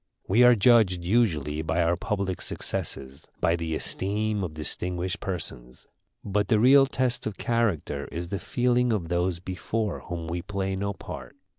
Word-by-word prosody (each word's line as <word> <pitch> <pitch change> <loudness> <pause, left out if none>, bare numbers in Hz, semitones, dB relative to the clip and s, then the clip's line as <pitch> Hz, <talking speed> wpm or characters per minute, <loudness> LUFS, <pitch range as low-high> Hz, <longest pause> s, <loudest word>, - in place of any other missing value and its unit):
We 110 +6 +4
are 125 0 +8
judged 105 -5 +4
usually 85 - +1
by 80 +2 0
our 85 +1 +2
public 100 -1 -2
successes, 70 +1 -4
by 85 - +2
the 80 -2 -3
esteem 105 +4 0
of 80 -4 -5
distinguished 90 +4 -1
persons. 65 -10 -5 0.4
But 105 0 0
the 110 - +3
real 135 +4 +6
test 130 -3 -1
of 105 - -5
character 100 -12 -1
is 85 +1 -5
the 100 - -3
feeling 125 +5 +1
of 95 -7 -1
those 90 0 0
before 95 +4 -3
whom 85 -2 -6
we 85 +1 -3
play 95 0 -3
no 100 +1 -2
part. - - -9
95 Hz, 160 wpm, -26 LUFS, 85-110 Hz, 0.4 s, are